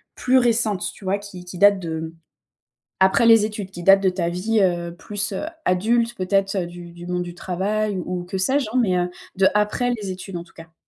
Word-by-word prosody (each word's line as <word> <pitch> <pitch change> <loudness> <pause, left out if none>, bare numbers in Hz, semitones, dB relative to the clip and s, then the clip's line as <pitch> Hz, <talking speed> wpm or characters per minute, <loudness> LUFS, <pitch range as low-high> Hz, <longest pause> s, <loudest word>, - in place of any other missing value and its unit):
plus 260 +1 +2
récente, 230 -5 +2
tu 195 - -14
vois, 195 +2 +1
qui 200 -3 -10
qui 180 0 -9
date 200 +1 +5
de 160 -2 -5 0.9
après 190 +5 +4
les 225 -2 +7
études, 210 -3 -5
qui 175 - -8
date 195 +2 +6
de 190 - +4
ta 180 -2 -2
vie, 210 +6 0
heu, 175 -2 0
plus, 205 +4 -4
heu, 195 - -3 0.2
adulte, 230 +6 +1
peut-être 195 0 0
du 175 0 -10
du 175 +1 -10
monde 180 0 -1
du 175 -1 -8
travail 200 +3 -2
ou 180 -1 -4
que 190 +2 -4
sais-je, 265 +8 +1
hein? 255 - +1
Mais 185 -5 +1
heu, 180 0 0 0.3
de 195 - +5
après 210 +4 +1
les 205 -4 -5
études, 185 +1 -8
en 170 - -4
tout - - -22
cas. 165 0 -14
190 Hz, 215 wpm, -22 LUFS, 180-210 Hz, 0.9 s, les